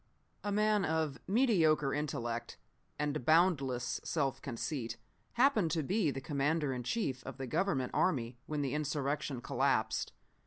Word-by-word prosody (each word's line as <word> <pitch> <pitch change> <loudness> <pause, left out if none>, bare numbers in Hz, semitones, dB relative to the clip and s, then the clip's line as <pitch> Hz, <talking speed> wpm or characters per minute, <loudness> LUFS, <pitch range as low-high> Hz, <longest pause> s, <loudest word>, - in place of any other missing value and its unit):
"A 205 - -1
man 210 0 +3
of 160 -3 0
mediocre 175 - +3
intellect 120 -5 -3 0.4
and 150 -2 -1
boundless 140 -6 +2
self 140 -5 -1
conceit 125 -1 -4 0.4
happened 240 - +3
to 160 - 0
be 190 +2 +1
the 135 - -3
commander 145 +1 0
in 125 - -3
chief 130 - -2
of - - -7
the 135 - -4
government 150 -2 0
army 120 -8 0
when 150 -1 -1
the 135 - -1
insurrection 145 -2 -1
collapsed. 120 -4 0
150 Hz, 140 wpm, -33 LUFS, 130-165 Hz, 0.4 s, man